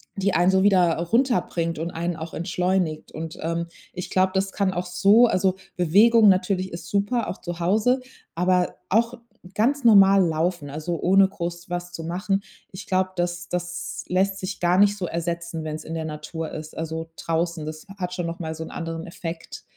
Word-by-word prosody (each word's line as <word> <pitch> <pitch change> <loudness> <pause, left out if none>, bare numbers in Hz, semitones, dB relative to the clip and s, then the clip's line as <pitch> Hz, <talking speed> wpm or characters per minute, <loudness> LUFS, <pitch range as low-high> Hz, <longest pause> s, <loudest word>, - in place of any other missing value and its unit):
die 195 -1 0
einen 175 +3 +4
so 190 0 +3
wieder, 185 -4 +4
runterbringt 170 - 0
und 170 +1 -3
einen 170 0 -3
auch 160 0 -7
entschleunigt. 180 -2 -1
Und, 160 +1 -6
ähm, 170 +1 -2 0.3
ich 180 -1 -6
glaube, 185 0 +2
das 190 0 +1
kann 190 -1 0
auch 180 0 -2
so 205 +6 +5
also 190 -3 +1 0.2
Bewegung 210 +6 +5
natürlich 185 -1 +1
ist 170 - -7
super, 205 +4 0
auch - - -5
zu 175 -1 -5
Hause, 220 +8 +2 0.4
aber 180 +1 +2 0.2
auch 230 +4 +2 0.4
ganz 260 +4 +1
normal 195 -3 +7
laufen, 160 -1 -1
also 155 +3 -4
ohne 195 +2 +5
groß 175 -1 -6
was 175 0 -4
zu 165 - -6
machen. 190 +4 -1 0.3
Ich 185 +1 -9
glaube, 185 -1 +1
das 175 0 -2
das 180 0 -4
lässt 195 +2 +1
sich 185 0 -5
gar 175 +1 +3
nicht 205 0 +4
so 185 - -3
ersetzen, 170 -1 -3
wenn's 155 0 -5
in 165 - -6
der 160 -1 -3
Natur 155 +1 -5
ist. 155 0 -8
Also 160 0 -4
draußen, 165 -1 -1
das 155 0 -7
hat 180 -2 -3
schon 175 - -2
noch 165 0 -5
mal 160 -2 -4
so 160 - -5
'n - - -10
anderen 165 -1 -5
Effekt. 170 -1 -7
175 Hz, 190 wpm, -24 LUFS, 165-195 Hz, 0.4 s, normal